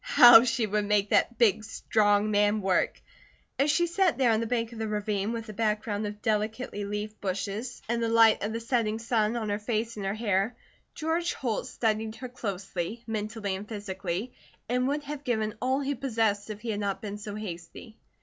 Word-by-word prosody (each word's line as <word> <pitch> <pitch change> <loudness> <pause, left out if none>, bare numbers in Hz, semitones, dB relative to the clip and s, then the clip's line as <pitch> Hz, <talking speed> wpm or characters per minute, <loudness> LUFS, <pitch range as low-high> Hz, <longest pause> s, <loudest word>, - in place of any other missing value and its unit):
How 240 - +9
she 235 -1 +1
would 210 0 0
make 205 -1 +1
that 240 - +3
big, 220 -3 +3
strong 210 -1 +1
man 205 +1 +3
work! 190 -1 +1 0.6
As 280 +2 +3
she 345 +4 +3
sat 355 +1 +1
there 255 -3 +4
on 220 - +2
the 230 - -2
bank 230 -1 -1
of 225 - -9
the 220 - -2
ravine, 210 0 -1
with 230 -1 -4
a - - -6
background 210 -1 -1
of 210 0 -8
delicately 215 0 -1
leafed 210 +1 -5
bushes 200 +5 -4
and 235 +1 0
the 230 - +1
light 225 -1 +5
of 210 - -2
the 230 - -3
setting 230 -2 0
sun 225 -1 0
on 220 -2 -3
her 205 0 -1
face 220 +1 -2
and 200 - -4
her 195 - -1
hair, 215 0 0 0.4
George 330 +2 -1
Holt 235 -5 -2
studied 220 -1 -1
her 255 +2 -7
closely, 200 -2 -4
mentally 215 -2 -3
and 200 +3 -8
physically, 200 +1 -4 0.3
and 250 +2 +1
would 290 +2 -1
have 290 0 -6
given 220 -4 -1
all 260 +2 +1
he 280 +1 -1
possessed 225 -6 0
if 210 -1 -6
he 230 0 -3
had 205 - -2
not 200 -1 -2
been 205 0 -5
so 205 0 -6
hasty. 210 +2 -8
220 Hz, 200 wpm, -28 LUFS, 205-235 Hz, 0.6 s, How